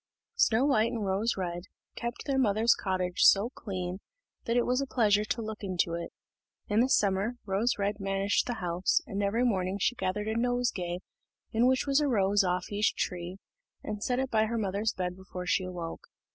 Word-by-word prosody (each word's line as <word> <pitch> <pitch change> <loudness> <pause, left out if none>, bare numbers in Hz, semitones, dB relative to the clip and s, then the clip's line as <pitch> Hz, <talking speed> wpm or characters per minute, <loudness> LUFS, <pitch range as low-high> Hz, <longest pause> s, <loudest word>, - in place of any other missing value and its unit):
Snow 235 +4 +4
white 230 -5 +3
and 225 -4 -3
Rose 200 +5 0
red 175 -1 -3 0.3
kept 235 0 -5
their 275 -2 +1
mother's 220 -1 +4
cottage 185 -2 -2
so 210 +5 +6
clean, 185 -5 -5 0.5
that 230 +1 +1
it 240 - +3
was 255 +2 +1
a 275 - -2
pleasure 210 -5 +3
to 230 +1 -2
look 220 0 -6
into 180 -4 -1
it. 170 0 -4 0.6
In 210 +1 +2
the 250 +3 +3
summer, 200 -2 +2
Rose 205 +5 +1
red 205 +1 -1
managed 195 0 0
the 240 - -2
house, 180 -2 0
and 200 +1 -3
every 205 +5 +1
morning 190 -5 0
she 205 - +1
gathered 210 -2 -2
a 220 - -1
nosegay 230 -8 -1 0.5
in 230 +3 +3
which 260 0 +2
was 275 0 +3
a 295 - +2
rose 205 -4 +3
off 180 +1 -1
each 205 +1 +1
tree, 180 +1 -3 0.5
and 210 0 -4
set 250 - 0
it 265 0 -1
by 220 -1 +3
her 230 +1 -2
mother's 205 +1 0
bed 180 -1 -3
before 185 -1 -8
she 185 +1 +1
awoke. 175 -2 -6
205 Hz, 195 wpm, -29 LUFS, 185-235 Hz, 0.6 s, so